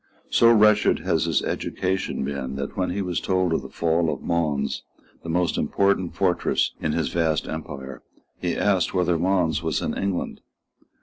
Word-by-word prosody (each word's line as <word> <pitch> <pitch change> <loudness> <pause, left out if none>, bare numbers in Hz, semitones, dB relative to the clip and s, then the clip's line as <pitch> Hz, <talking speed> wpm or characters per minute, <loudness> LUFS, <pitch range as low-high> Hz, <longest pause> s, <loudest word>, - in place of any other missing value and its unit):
So 115 0 +6
wretched 105 -2 +5
had - - +1
his - - +1
education 95 +1 -2
been 70 -2 -4
that, 70 0 -5
when 95 -2 0
he 100 +2 -2
was 90 -2 -1
told 95 -2 +1
of - - 0
the - - -9
fall 80 0 +1
of 70 - -6
Mons, 75 -5 -1 0.4
the 85 - -8
most 90 +1 +1
important 100 -3 +1
fortress 90 -3 +1
in - - 0
his - - 0
vast 80 -2 0
empire, 70 -5 -6 0.4
he 90 -1 -1
asked 95 -2 +1
whether 90 -2 +2
Mons 90 -3 +1
was 80 -4 -1
in - - -2
England. 100 -2 -2
85 Hz, 170 wpm, -24 LUFS, 80-95 Hz, 0.4 s, So